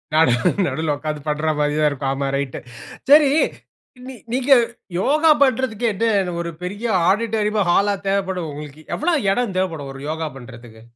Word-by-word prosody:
நானும் 130 +3 +3
நடுவுல 160 -1 -1
உட்கார்ந்து 150 0 -5
பண்றாமாரி 150 -1 0
தான் 150 -1 +3
இருக்கும். 135 -1 -3
ஆமா 135 0 -2
ரைட். 140 -2 -4 0.5
சரி 290 -1 +7 0.8
நீ 265 - -8 0.2
நீங்க 265 +2 +4 0.5
யோகா 305 - +3
பண்றதுக்கே 255 -4 0
என்ன 200 -4 0
ஒரு 170 - -4
பெரிய 205 +6 -5 0.2
ஆடிட்டோரியமா! 215 0 0
ஹாலா 200 +3 +3
தேவைப்படும்? 190 -4 -1
உங்களுக்கு 150 +1 -9
எவ்ள 335 +2 0 0.2
இடம் 230 -3 -1
தேவைப்படும்? 165 -7 -2
ஒரு 135 - -10
யோகா 160 0 -3
பண்றதுக்கு. 120 -3 -12
180 Hz, 140 wpm, -20 LUFS, 150-225 Hz, 0.8 s, சரி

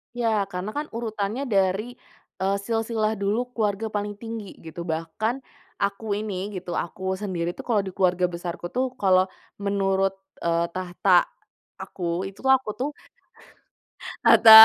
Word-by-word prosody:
Ya, 220 -4 +1
karena 180 +3 -3
kan 300 +1 -1
urutannya 220 +1 -2
dari, 210 +1 +1 0.4
eee, 195 +1 +2
silsilah 225 -2 0
dulu 220 +5 0
keluarga 215 -2 0
paling 205 0 -2
tinggi 225 -2 -6
gitu 170 +2 -7
bahkan 170 +11 -2 0.3
aku 200 +1 -1
ini 205 -1 -3
gitu, 180 -1 -5
aku 190 +2 -3
sendiri 175 -4 -1
tuh - - -6
kalo 225 -4 +3
di 190 - -5
keluarga 180 -1 +2
besarku 175 0 -5
tuh 255 +1 +1 0.2
kalo 185 -1 +5 0.3
menurut, 195 -1 +1 0.3
eee, 170 0 +2
tahta 180 0 +3 0.6
aku 175 0 -2
itu 195 - -17 0.2
aku 260 -4 -3
tuh 270 +3 0 1.3
Tata 225 - +9
200 Hz, 135 wpm, -25 LUFS, 185-220 Hz, 1.3 s, Tata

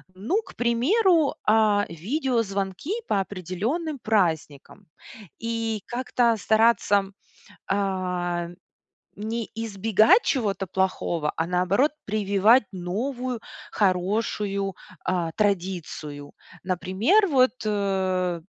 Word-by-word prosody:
Ну, 235 - 0
к - - -15
примеру, 305 - +3
а, 210 -1 +4
видеозвонки 205 - -2 0.2
по 195 - +1
определённым 205 - -3
праздникам 180 - -1 0.5
и 225 -2 -2
как-то 240 -1 +1
стараться, 220 -2 +3 0.6
а, 180 -3 -1 0.7
не 225 +2 -3
избегать 225 - +3
чего-то 205 -7 0
плохого, 175 -4 -1
а, 160 - 0
наоборот, 185 - +2
прививать 210 +3 +3
новую 240 +7 -3 0.3
хорошую, 195 0 0 0.3
а, 175 -3 0
традицию. 175 -7 -2 0.3
Например, 190 - +2
вот, 260 -6 +4
э, 190 -4 0
205 Hz, 85 wpm, -25 LUFS, 185-235 Hz, 0.7 s, а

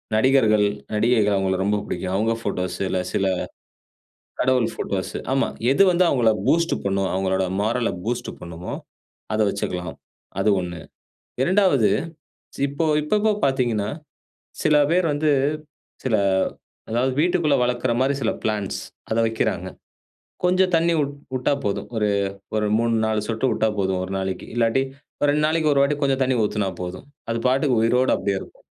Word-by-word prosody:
நடிகர்கள், 110 -4 +4 0.3
நடிகைகள் 105 -2 +3
அவுங்கள 95 -1 0
ரொம்ப 105 +1 +1
பிடிக்கும். 90 +1 -3
அவுங்க 110 +3 +1
ஃபோட்டோஸ், 90 -4 -3
இல்ல 95 - -1
சில 100 - +1 1.2
கடவுள் 125 -2 +3
ஃபோட்டோஸு, 95 -2 -3 0.2
ஆமா. 135 - +1 0.2
எது 140 - +4
வந்து 180 +1 +3
அவுங்கள 115 -4 +3 0.2
பூஸ்ட் 170 +1 +3
பண்ணும், 95 -1 0
அவுங்களோட 95 0 0 0.2
மாரல 115 +1 0 0.2
பூஸ்ட் 120 +1 -2
பண்ணுமோ, 85 +1 -7 0.6
அத 110 - 0
வச்சிக்கலாம். 90 -4 -4 0.4
அது 105 - +3
1 85 -1 -5 0.6
2வது 180 - +3 0.7
சி - - -9
இப்போ 145 +4 -2 0.2
இப்போ 150 - -1
இப்போ 220 0 +3
பாத்தீங்கன்னா, 120 -6 0 0.7
சில 155 -1 +4 0.2
பேர் 180 -1 +3
வந்து 150 +1 +1 0.7
சில, 125 -4 +2 0.7
அதாவது 125 +3 +1
வீட்டுக்குள்ள 170 -3 +2
வளக்குற 125 0 0
மாரி 135 +2 +2
சில 115 - +2
பிளான்ட்ஸ் 105 -3 -2 0.3
அத 110 - +1
வைக்கிறாங்க. 110 0 -1 0.8
கொஞ்சம் 185 +1 +3
தண்ணீ 170 +1 +3
உட் 140 0 -3 0.2
உட்டா 130 +3 +1
போதும். 100 - -2
ஒரு 105 -1 +1 0.5
1 105 -1 +1
3 115 0 +1
4 110 -1 0
சொட்டு 115 +3 -1
உட்டா 110 - +1
போதும் 95 -1 0
ஒரு 95 - -6
நாளைக்கு, 95 0 -4
இல்லாட்டி 120 +3 +2 0.4
ஒரு 145 - +3
2 150 +1 +2
நாளைக்கு 155 -1 +2
1 140 - +3
வாட்டி 145 +1 +1
கொஞ்சம் 135 -1 +1
தண்ணீ 130 0 +1
ஊத்துனா 105 -2 0
போதும். 90 +9 -6 0.2
அது 115 - -1
பாட்டுக்கு 130 -2 +2
உயிரோட 125 +3 +3
அப்டியே 100 -1 -1
இருக்கும். - - -14
115 Hz, 150 wpm, -23 LUFS, 100-140 Hz, 1.2 s, நடிகர்கள்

